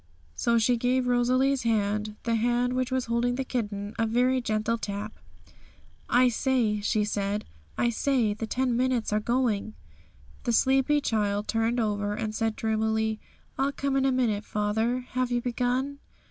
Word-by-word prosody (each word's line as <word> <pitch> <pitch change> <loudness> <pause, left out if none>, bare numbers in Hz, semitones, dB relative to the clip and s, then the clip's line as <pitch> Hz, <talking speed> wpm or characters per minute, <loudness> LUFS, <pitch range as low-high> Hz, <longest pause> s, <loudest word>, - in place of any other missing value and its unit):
So 235 - +1
she 235 +2 +3
gave 250 +2 +1
Rosalie's 255 +2 +2
hand, 210 -1 0
the 230 - 0
hand 240 +2 +1
which 255 0 -1
was 260 -1 0
holding 235 +1 0
the 270 - -2
kitten, 205 -5 -3
a 225 - +2
very 250 +3 +2
gentle 220 0 -1
tap. 205 +1 -4 1.0
'I 250 +1 +5
say,' 235 -4 +1
she 210 0 +1
said 205 0 -2 0.3
'I 240 - +2
say, 235 -3 +1
the 220 +2 -5
ten 250 +1 0
minutes 250 -3 0
are 210 - +3
going!' 220 -2 0 0.7
The 240 - +1
sleepy 270 +4 +3
child 210 -4 0
turned 230 +2 0
over, 205 -2 -1
and 215 -1 -3
said 225 0 -1
dreamily, 220 0 0 0.4
'I'll 275 +1 +1
come 280 -1 -1
in 270 0 +2
a 270 - +3
minute, 230 -5 +1
father; 220 +5 0
have 255 0 0
you 240 - +2
begun?' 250 +3 -1
235 Hz, 160 wpm, -27 LUFS, 215-255 Hz, 1.0 s, I